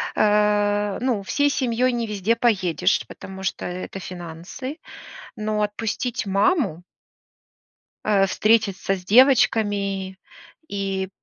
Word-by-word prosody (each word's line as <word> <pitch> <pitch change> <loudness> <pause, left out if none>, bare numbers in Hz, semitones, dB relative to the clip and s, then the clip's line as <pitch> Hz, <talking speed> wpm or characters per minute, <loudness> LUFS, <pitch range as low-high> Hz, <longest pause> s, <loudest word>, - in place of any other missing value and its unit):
э, 205 -1 +2
ну, 245 -5 0
всей 285 +8 +1
семьёй 255 -2 +1
не 235 -2 -2
везде 210 +2 0
поедешь, 190 -8 +1
потому 190 0 -10
что 190 - -3
это 185 +2 -5
финансы. 180 - -7 0.6
Но 215 0 -2
отпустить 225 +3 -2
маму 195 - +1 1.2
э, 195 -2 +4
встретиться 200 -2 +1
с 180 - -10
девочками 205 -5 +3 0.5
и 195 -1 -3
205 Hz, 100 wpm, -23 LUFS, 190-230 Hz, 1.2 s, э